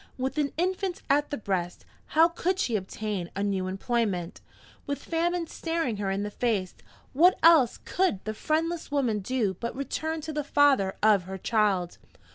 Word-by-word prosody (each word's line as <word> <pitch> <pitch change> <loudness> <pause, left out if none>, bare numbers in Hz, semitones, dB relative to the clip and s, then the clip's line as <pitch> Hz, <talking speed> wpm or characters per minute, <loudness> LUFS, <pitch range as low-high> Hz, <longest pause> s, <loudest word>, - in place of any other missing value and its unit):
With 265 +2 -2
an 285 -1 0
infant 370 +1 -1
at 290 +1 +2
the 290 - -3
breast, 185 -4 -3 0.2
how 320 +2 +5
could 360 +2 -1
she 245 - 0
obtain 195 -2 -3
a 200 - -1
new 195 -2 -1
employment? 195 -3 -2 0.5
With 285 0 -3
famine 340 +1 0
staring 325 -9 -2
her 200 -1 -2
in 195 +1 -1
the 210 - -4
face, 205 -6 -1 0.4
what 350 +7 +5
else 315 -8 +6
could 370 - 0
the 215 - -2
friendless 325 +7 -1
woman 255 -7 0
do 210 -1 -1
but 235 0 -4
return 315 +4 -3
to 310 +1 -6
the 300 0 -2
father 275 -9 +3
of 205 -4 +4
her 190 +1 -6
child? 195 -4 0
245 Hz, 170 wpm, -27 LUFS, 200-315 Hz, 0.5 s, else